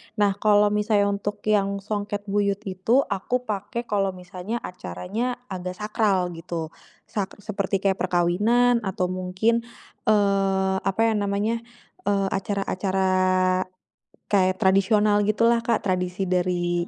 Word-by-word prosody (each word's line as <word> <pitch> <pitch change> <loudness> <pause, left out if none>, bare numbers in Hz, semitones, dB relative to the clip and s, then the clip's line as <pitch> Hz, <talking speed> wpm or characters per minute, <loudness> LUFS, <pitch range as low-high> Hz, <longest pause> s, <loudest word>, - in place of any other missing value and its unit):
nah 205 -2 +3
kalau 210 -1 +4
misalnya 210 -1 +2
untuk 205 +1 -4
yang 200 -2 +1
songket 205 0 -3
buyut 200 0 0
itu 210 +7 +1
aku 245 +6 -1
pakai 210 +1 -4
kalau 195 -4 -1
misalnya 180 +4 -6
acaranya 180 - -4 0.2
agak 180 -1 -4
sakral 200 -4 +1
gitu, 165 -1 -5 0.4
sa 200 -3 -1 0.2
seperti 195 -2 -2
kayak 195 -1 +1
perkawinan 205 +8 +3
atau 185 -1 -1
mungkin, 190 +6 0 0.4
eee, 195 -2 +2
apa 195 +3 -1
ya - - 0
namanya, 205 +3 0 0.5
eee, 200 -1 +2
acara-acara, 195 -1 -1 1.2
kayak 185 -2 +2
tradisional 205 +2 +4
gitulah 230 +2 +3
Kak 230 -1 0
tradisi 185 0 -1
dari 175 -1 0
200 Hz, 120 wpm, -24 LUFS, 185-210 Hz, 1.2 s, kalau